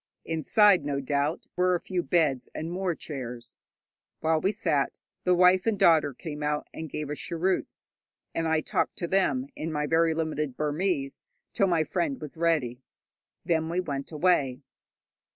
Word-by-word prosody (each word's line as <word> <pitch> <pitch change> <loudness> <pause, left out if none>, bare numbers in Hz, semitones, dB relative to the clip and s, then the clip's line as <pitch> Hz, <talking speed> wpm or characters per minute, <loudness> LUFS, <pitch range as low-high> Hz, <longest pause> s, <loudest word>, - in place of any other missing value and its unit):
Inside, 180 +3 +4
no 140 -1 -1
doubt, 140 +4 -1
were 180 0 +3
a - - -1
few 180 0 -2
beds 155 -8 +1
and 160 +2 -4
more 180 -1 -1
chairs. 125 -6 -7 0.6
While 160 0 +1
we 195 - +2
sat, 155 -10 0 0.3
the 180 0 +4
wife 180 +3 +5
and 220 -2 +2
daughter 160 -5 +5
came 150 -1 -7
out 150 0 -1
and 160 -1 -6
gave 150 +1 -4
us 150 - -4
cheroots, 180 +3 -2 0.4
and 165 0 -1
I 160 -1 +2
talked - - -1
to 170 - -3
them 155 -9 +1
in 160 +1 -4
my 150 -1 -1
very 165 +1 +2
limited 155 -4 -2
Burmese 150 -2 -1 0.3
till 195 - +3
my 170 -3 +2
friend 275 - -1
was 150 0 -8
ready. 155 -7 0 0.6
Then 160 -1 +1
we 175 +2 0
went 140 -6 -4
away. 145 -5 +1
160 Hz, 165 wpm, -27 LUFS, 145-180 Hz, 0.6 s, wife